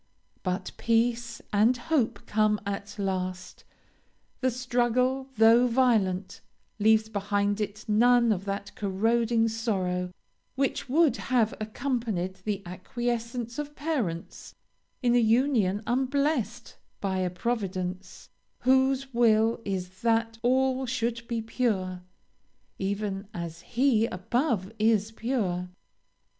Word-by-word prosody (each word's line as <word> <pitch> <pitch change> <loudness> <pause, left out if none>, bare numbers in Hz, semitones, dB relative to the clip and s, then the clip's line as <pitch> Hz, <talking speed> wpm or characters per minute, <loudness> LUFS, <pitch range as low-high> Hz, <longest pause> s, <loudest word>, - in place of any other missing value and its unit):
But 185 0 -2
peace 235 0 0
and 220 +5 +4
hope 260 -2 0
come 215 0 +2
at 200 +1 -5
last 185 -2 -3 0.8
the 260 - +2
struggle, 250 +1 0
though 230 +3 +6
violent, 220 -7 +1 0.4
leaves 220 +1 +4
behind 205 0 0
it 210 +1 -4
none 235 +2 +4
of 195 -2 -1
that 200 0 -4
corroding 225 +3 +1
sorrow, 190 -6 -1 0.5
which 275 -1 -1
would 315 +2 +4
have 235 -4 +1
accompanied 215 -5 -2
the 205 -2 -2
acquiescence 235 +6 -3
of 295 0 -5
parents 250 - -3 0.5
in 240 -1 +3
a 245 - +5
union 225 -4 +2
unblessed 260 -2 -1 0.2
by 190 -2 -1
a 185 -1 0
Providence, 185 -2 -4 0.3
whose 265 +1 +2
will 225 -1 +3
is 185 -1 -4
that 225 -1 +1
all 260 +1 +2
should 235 -1 -2
be 230 -2 -2
pure, 195 -6 -1 0.8
even 200 0 -2
as 170 -1 -6
He 235 -3 +2
above 210 - -1
is 215 -1 +2
pure. 205 -7 -2
225 Hz, 110 wpm, -27 LUFS, 195-245 Hz, 0.8 s, though